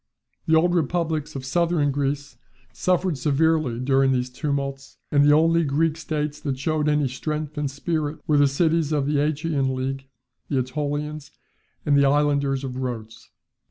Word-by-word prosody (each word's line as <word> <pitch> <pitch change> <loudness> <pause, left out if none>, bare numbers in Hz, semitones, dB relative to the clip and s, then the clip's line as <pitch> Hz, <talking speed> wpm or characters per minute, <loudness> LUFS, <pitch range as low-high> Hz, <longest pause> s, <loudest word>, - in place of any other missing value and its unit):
The 160 - +4
old 175 +2 +3
republics 160 -2 -1
of 130 -1 -5
southern 165 0 +1
Greece 140 +1 -2 0.4
suffered 180 -4 0
severely 150 -3 +1
during 135 +1 +2
these 125 -1 -1
tumults, 140 0 -4
and 145 -1 +4
the 145 - +5
only 165 +2 +4
Greek 155 +2 +1
states 150 -2 -3
that 135 -3 -3
showed 150 +2 0
any 150 -2 +2
strength 150 +3 -4
and 145 -2 -2
spirit 150 +1 -2
were 150 - +2
the 145 - +5
cities 160 +2 +1
of 145 -3 +1
the 145 0 +1
Achaean 145 -3 0
league, 135 +1 -4 0.4
the 130 -3 +1
AEtolians, 145 +2 -4 0.6
and 145 -2 +3
the 140 0 +5
islanders 140 -1 +2
of 130 -1 -5
Rhodes. 115 -4 -6
145 Hz, 160 wpm, -24 LUFS, 135-155 Hz, 0.6 s, the